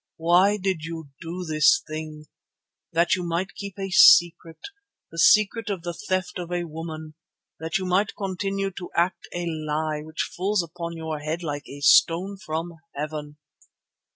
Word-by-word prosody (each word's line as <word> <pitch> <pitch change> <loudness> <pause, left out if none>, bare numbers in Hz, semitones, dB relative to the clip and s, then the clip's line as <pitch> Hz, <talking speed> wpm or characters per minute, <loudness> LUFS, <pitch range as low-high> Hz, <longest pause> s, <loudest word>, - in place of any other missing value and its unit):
Why 180 +5 +4
did 190 -5 -2
you 165 -2 -7
do 175 +2 -5
this 155 - +4
thing? 155 -1 -7 0.7
That 170 +1 +2
you 185 - 0
might 175 +2 -2
keep 200 -1 -8
a 195 -1 -4
secret, 170 -3 +6 0.5
the 165 - -6
secret 215 +4 +4
of 190 -4 -3
the 175 -1 -3
theft 185 -1 -3
of 175 -1 -6
a 175 0 -1
woman, 160 -1 -7 0.5
that 160 0 -1
you 190 - -4
might 185 +3 +1
continue 195 0 -2
to 180 -1 -8
act 175 +2 0
a 175 0 -3
lie 155 -1 -2
which 155 +1 -4
falls 190 +1 +1
upon 170 0 -7
your 160 -2 -4
head 155 +4 -4
like 145 -2 -5
a 140 +1 -9
stone 180 +7 +4
from 165 +1 -4 0.2
heaven. 150 0 -5
170 Hz, 160 wpm, -25 LUFS, 155-185 Hz, 0.7 s, secret